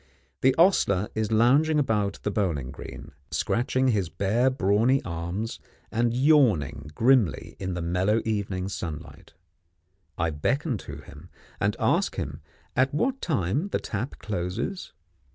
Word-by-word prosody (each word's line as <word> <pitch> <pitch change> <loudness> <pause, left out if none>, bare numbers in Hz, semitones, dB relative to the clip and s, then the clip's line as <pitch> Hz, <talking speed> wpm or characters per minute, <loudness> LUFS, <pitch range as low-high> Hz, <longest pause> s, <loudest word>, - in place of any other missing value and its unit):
The 130 0 +4
ostler 105 - +3
is 110 0 -1
lounging 140 +8 +4
about 105 -8 +1
the 105 - 0
bowling 80 -11 -1
green, 70 - -9 0.2
scratching 125 - +1
his 100 -7 0
bare 110 +9 +1
brawny 115 +2 +2
arms 85 +6 -4 0.3
and 115 +1 +1
yawning 125 - +3
grimly 115 - +2
in 95 -2 -3
the 85 - -3
mellow 90 +6 +1
evening 100 -4 -2
sunlight. 80 -6 -7 0.8
I 85 -2 0
beckon 130 - -1
to - - -7
him, 75 +6 -13 0.3
and - - +1
ask - - +1
him - - -5 0.3
at 130 +1 +3
what 265 - 0
time 140 - 0
the - - -1
tap 115 +6 -4
closes? 100 - -4
105 Hz, 135 wpm, -26 LUFS, 90-130 Hz, 0.8 s, The